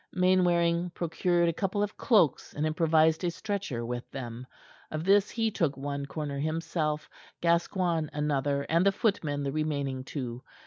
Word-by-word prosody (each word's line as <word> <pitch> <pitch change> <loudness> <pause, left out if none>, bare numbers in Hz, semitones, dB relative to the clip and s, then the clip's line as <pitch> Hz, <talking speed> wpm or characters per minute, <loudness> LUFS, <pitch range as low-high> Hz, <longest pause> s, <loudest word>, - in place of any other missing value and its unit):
Mainwaring 175 -2 +3
procured 170 +1 +1
a 170 - +1
couple 200 +4 -1
of 205 - -3
cloaks 205 - +2
and 150 - 0
improvised 160 +1 +3
a 175 - +2
stretcher 185 - -3
with 120 +1 -5
them. 125 -2 -7 0.4
Of 155 0 -3
this 200 +2 +4
he 225 -1 0
took 155 -8 0
one 140 0 -4
corner 145 -1 -4
himself, 155 0 -1 0.3
Gascoigne 170 -1 +1
another, 145 -1 0
and 165 +4 +2
the 200 - +5
footmen 155 -9 0
the 140 - -1
remaining 140 -3 -2
two. 125 -3 -5
160 Hz, 150 wpm, -29 LUFS, 140-180 Hz, 0.4 s, the